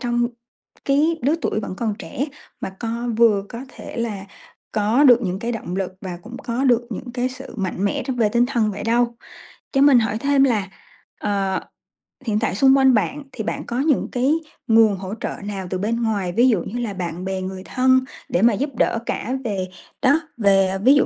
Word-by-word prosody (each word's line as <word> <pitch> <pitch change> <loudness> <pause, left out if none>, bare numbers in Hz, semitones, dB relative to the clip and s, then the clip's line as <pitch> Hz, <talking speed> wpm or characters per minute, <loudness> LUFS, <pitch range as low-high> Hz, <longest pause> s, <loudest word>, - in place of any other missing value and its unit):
trong 240 -1 +1 0.6
cái 305 +4 +2
lứa 290 +5 +3
tuổi 215 0 0
vẫn 195 -3 -5
còn 220 -2 -1
trẻ 275 - -3 0.3
mà - - -3
co 235 +1 -3
vừa 220 -4 +4
có 235 0 -7
thể - - -10
là 215 -5 -3 0.5
có 220 +7 +3
được 245 -2 +7
những 185 -1 -2
cái 235 +3 -3
động 190 -5 -4
lực 190 -1 -2
và 180 -3 -6
cũng 235 +2 -9
có 240 +3 -2
được 240 -2 +3
những 245 +3 -6
cái 250 0 0
sự 260 +1 -10
mạnh 190 0 -2
mẽ 200 - 0
trong 260 -2 -2
về 220 -3 +3
tinh 235 +3 +3
thần 235 -5 +1
vậy 200 - -6
đâu. 235 +1 +1 0.6
Cho 270 - +2
mình 280 -3 +7
hỏi 220 -1 0
thêm 280 +1 +3
là, 215 -7 +1 0.5
ờ, 195 -2 0 0.7
hiện 215 -3 +1
tại 220 -4 -1
xung 270 +4 +5
quanh 265 -1 +5
bạn 280 +7 0
thì 225 -4 -5
bạn - - -3
có 240 +1 -3
những 290 -1 +2
cái 255 +4 +2 0.3
nguồn 225 -2 +5
hỗ 190 +1 -6
trợ - - -3
nào 195 -3 -4
từ 185 - -1
bên 230 +5 -1
ngoài, 200 -5 0
ví 240 +7 +4
dụ 205 -7 +2
như 240 - -5
là 225 -4 -2
bạn 180 -1 -4
bè, 190 0 -2
người 185 0 -5
thân 260 0 +3 0.3
để 175 - +1
mà 235 -1 +5
giúp 280 +8 -1
đỡ 230 - +1
cả 245 - -2
về 195 -4 -2 0.3
đó, 285 +4 +4 0.2
về, 195 -3 +3
ví 265 +4 +7
dụ 290 - +4
230 Hz, 215 wpm, -22 LUFS, 200-250 Hz, 0.7 s, được